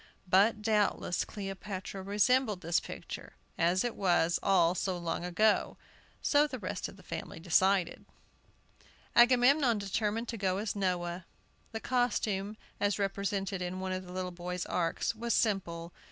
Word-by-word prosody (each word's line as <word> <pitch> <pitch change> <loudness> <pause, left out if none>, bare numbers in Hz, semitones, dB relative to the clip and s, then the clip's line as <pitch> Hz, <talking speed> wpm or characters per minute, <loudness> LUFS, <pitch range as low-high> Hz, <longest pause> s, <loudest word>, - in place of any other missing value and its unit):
But 210 +4 +4
doubtless 210 -4 +1
Cleopatra 195 -1 -6
resembled 210 +1 +2
this 170 +1 +1
picture, - - -8 0.2
as 175 +3 +2
it 240 -2 -2
was 175 -3 +2
all 175 -3 +4
so 185 0 -2
long 170 0 -3
ago, 210 +5 +2 0.5
so 295 +1 +4
the 260 - -5
rest 185 -4 -4
of 195 - -12
the 190 - -16
family - - -6
decided. 185 +1 +2 1.1
Agamemnon 245 +1 +5
determined 210 +3 -1
to 230 - -4
go 190 -2 0
as 210 +1 -2
Noah. 180 -2 -2 0.4
The 225 -1 -5
costume, 215 -5 0 0.2
as 205 0 +1
represented 195 -1 -2
in 180 +1 -3
one 190 0 -3
of 185 0 -3
the 180 - -11
little 180 0 -3
boys' 180 +1 -4
arks, 170 +4 -1
was 235 +1 -1
simple. 175 -6 -1
195 Hz, 145 wpm, -31 LUFS, 180-215 Hz, 1.1 s, Agamemnon